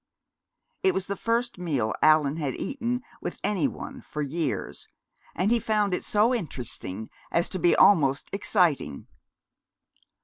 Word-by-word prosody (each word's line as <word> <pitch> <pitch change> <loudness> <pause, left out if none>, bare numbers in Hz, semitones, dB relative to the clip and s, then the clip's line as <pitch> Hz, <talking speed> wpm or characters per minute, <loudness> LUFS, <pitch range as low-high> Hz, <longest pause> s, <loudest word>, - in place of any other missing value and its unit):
It 380 -1 +3
was 190 - 0
the 200 - -3
first 230 0 -1
meal 140 -11 -1
Allan 155 -1 +4
had 145 -5 -2
eaten 250 -2 -3 0.2
with - - -5
any 200 -6 +1
one - - -8
for 150 - -4
years, 150 0 -3 0.5
and 190 +5 +1
he 240 - +4
found 210 -3 +1
it - - -1
so 215 +4 +3
interesting 120 - -5 0.2
as 170 - +1
to 185 - -4
be 175 - +4
almost 140 -8 +4
exciting. 175 - +1
180 Hz, 140 wpm, -26 LUFS, 145-215 Hz, 0.5 s, Allan